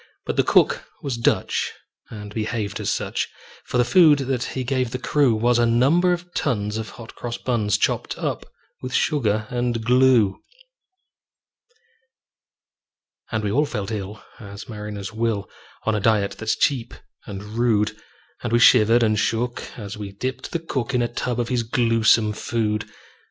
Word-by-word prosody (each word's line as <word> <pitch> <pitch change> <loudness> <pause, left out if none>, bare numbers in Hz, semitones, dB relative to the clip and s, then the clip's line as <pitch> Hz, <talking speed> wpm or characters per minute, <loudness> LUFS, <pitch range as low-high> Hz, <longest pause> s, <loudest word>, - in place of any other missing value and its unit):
But - - -2
the - - +4
cook - - +3 0.2
was 135 -4 -2
Dutch, 115 - 0 0.4
and 105 -2 -9
behaved 110 -2 -3
as - - -2
such; - - -2 0.4
For - - -2
the 125 - +4
food 155 +2 +6
that 135 -2 -2
he 130 +1 -3
gave 130 -1 0
the 125 - -3
crew 135 -2 +2
Was 120 +2 +2
a 120 - +4
number 140 +10 +3
of 175 0 -3
tons 105 -6 -1
of 110 -2 -4
hot 115 -1 -10
cross 120 -1 -5
buns, 105 -5 0
Chopped - - -1
up - - -3 0.3
with 130 0 -4
sugar 110 -7 +1
and 120 -2 -1
glue. 125 -5 +4 2.9
And 110 -2 -1
we 105 - -1
all 145 +6 +2
felt 105 -3 -4
ill 105 0 -5 0.2
as 100 -2 -9
mariners 105 -1 -6
will, 110 -2 -1 0.4
On 110 - +2
a 105 - +1
diet 105 -1 +2
that's 110 -1 0
cheap 125 -4 0 0.3
and 100 -2 -6
rude; 110 0 +1 0.5
And - - -3
we 120 - +4
shivered 120 0 +6
and 110 -1 +2
shook 120 +3 -1 0.2
as 105 -2 -7
we 100 -2 -7
dipped 130 +6 -4
the - - 0
cook 140 -6 -3
In 120 - +2
a - - +1
tub 120 0 -2
of 120 - -1
his 125 -2 +1
gluesome 115 -2 +3
food. 105 -1 -2
115 Hz, 165 wpm, -23 LUFS, 105-125 Hz, 2.9 s, food